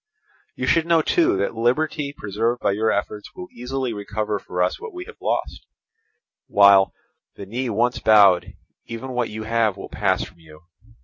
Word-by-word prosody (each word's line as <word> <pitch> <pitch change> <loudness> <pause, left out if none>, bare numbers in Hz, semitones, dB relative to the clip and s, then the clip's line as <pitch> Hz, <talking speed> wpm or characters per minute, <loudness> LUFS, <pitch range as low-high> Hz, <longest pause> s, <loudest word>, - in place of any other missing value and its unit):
You - - -3
should 165 -1 +2
know 165 -2 +3
too 345 - +2
that - - -1
liberty 140 +5 0
preserved 115 -1 -2
by - - +1
your 110 +3 +1
efforts 105 +1 -4
will 180 - -7
easily 125 0 -4
recover 105 0 -3
for 90 -1 -2
us 90 - -1
what 455 -5 -8
we 355 0 -6
have - - -14
lost, - - -3 0.8
while, 100 -1 +6 0.4
the 100 - -8
knee 120 +5 -3
once 120 +3 0
bowed, 95 -4 +5 0.3
even 115 +3 -6
what 125 -2 -1
you 110 +1 -6
have 110 -2 0
will - - -8
pass 95 -3 0
from 95 -2 -12
you. 75 -2 -16
110 Hz, 175 wpm, -22 LUFS, 100-130 Hz, 0.8 s, while